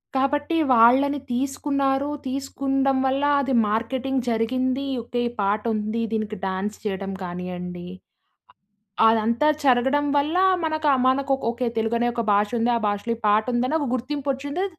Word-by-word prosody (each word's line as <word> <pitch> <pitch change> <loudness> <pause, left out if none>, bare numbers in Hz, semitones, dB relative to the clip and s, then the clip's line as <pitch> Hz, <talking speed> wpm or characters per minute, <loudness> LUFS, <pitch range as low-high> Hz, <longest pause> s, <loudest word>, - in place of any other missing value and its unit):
కాబట్టి 290 +4 0 0.2
వాళ్ళని 260 +5 +5
తీసుకున్నారు. 275 +1 -1 0.2
తీసుకుండం 270 0 -1
వల్ల 270 +2 0 0.2
అది 270 -1 -1 0.2
మార్కెటింగ్ 255 +4 -1
జరిగింది. 255 +4 0 0.2
ఓకే. 240 +1 -3
ఈ - - -11
పాటుంది. 215 +2 -1
దీనికి 215 -1 -2
డాన్స్ 190 +2 -3
చెయ్యటం 195 -2 -3
కానియ్యండి, 180 0 -6 1.2
అ - - +8
అదంతా 230 +5 +1 0.2
జరగడం 265 +2 +3
వల్ల 300 +5 +1 0.3
మనకా 310 -1 0 0.2
మనకొక, 270 +1 +1
ఓకే 240 +1 -3
తెలుగు 225 +1 0
అనే 240 - +1
ఒక 235 - -1
భాషుంది. 225 +4 +1
ఆ - - +1
భాషలో 205 +3 -1
ఈ - - -21
పాటుందని 240 +7 +1
ఒక 285 - -1
గుర్తింపొచ్చింది. 285 +5 -3
250 Hz, 130 wpm, -23 LUFS, 220-275 Hz, 1.2 s, అ